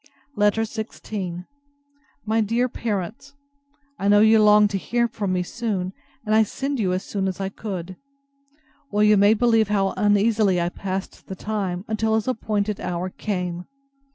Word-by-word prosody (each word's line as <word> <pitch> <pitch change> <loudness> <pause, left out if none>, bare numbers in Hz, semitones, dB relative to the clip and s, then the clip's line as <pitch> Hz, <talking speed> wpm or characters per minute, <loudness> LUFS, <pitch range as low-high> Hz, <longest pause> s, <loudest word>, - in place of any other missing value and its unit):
LETTER 210 +2 +2
XVI 210 -5 -5 0.8
MY 220 +1 +1
DEAR 230 +4 +1
PARENTS, 225 +4 -4 0.6
I 200 - -1
know 205 0 +6
you 220 +1 +6
longed 210 0 +6
to 195 - -1
hear 235 +4 0
from 210 -4 -3
me 180 -1 0
soon; 195 -3 -3 0.3
and 215 - 0
I 220 - +6
send 270 +5 -2
you 190 -4 +1
as 185 +1 -1
soon 195 -2 -2
as 190 0 -4
I 195 0 -2
could. 185 -3 -6 0.9
Well, 210 0 +2
you 210 0 +6
may 205 +2 +5
believe 225 -1 +3
how 195 -2 +1
uneasily 205 -1 +3
I 170 0 0
passed 190 +1 -6
the 190 - -6
time, 195 -2 -3
till 220 0 +1
his 220 +1 -1
appointed 210 -4 -1
hour 180 +1 -3
came. 180 -4 -4
205 Hz, 160 wpm, -23 LUFS, 190-220 Hz, 0.9 s, know